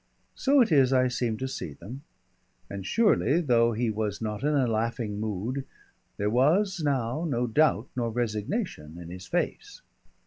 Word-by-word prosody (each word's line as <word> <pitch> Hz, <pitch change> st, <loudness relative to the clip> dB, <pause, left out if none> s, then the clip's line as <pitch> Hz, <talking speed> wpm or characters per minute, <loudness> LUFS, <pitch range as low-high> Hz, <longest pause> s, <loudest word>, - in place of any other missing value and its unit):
So 275 Hz, 0 st, +3 dB
it 230 Hz, -, +2 dB
is 135 Hz, -4 st, +5 dB
I 130 Hz, -1 st, +3 dB
seem 120 Hz, -3 st, -1 dB
to 130 Hz, -, -3 dB
see 85 Hz, -, -6 dB
them, 115 Hz, -, -10 dB, 0.7 s
and 100 Hz, -1 st, -5 dB
surely 200 Hz, -, +3 dB
though 120 Hz, -7 st, +3 dB
he 115 Hz, +1 st, 0 dB
was 105 Hz, -1 st, -3 dB
not 105 Hz, -1 st, -4 dB
in 150 Hz, +2 st, +1 dB
a 135 Hz, -3 st, +3 dB
laughing 110 Hz, -2 st, -2 dB
mood, 110 Hz, +6 st, -3 dB, 0.5 s
there 100 Hz, -, -1 dB
was 175 Hz, -, +2 dB
now 135 Hz, +1 st, 0 dB
no 125 Hz, -7 st, 0 dB
doubt 125 Hz, -1 st, +2 dB
nor 120 Hz, -2 st, -1 dB
resignation 110 Hz, -, -3 dB
in 85 Hz, -1 st, -9 dB
his 90 Hz, 0 st, -9 dB
face. -, -, -3 dB
120 Hz, 165 wpm, -27 LUFS, 110-140 Hz, 0.7 s, is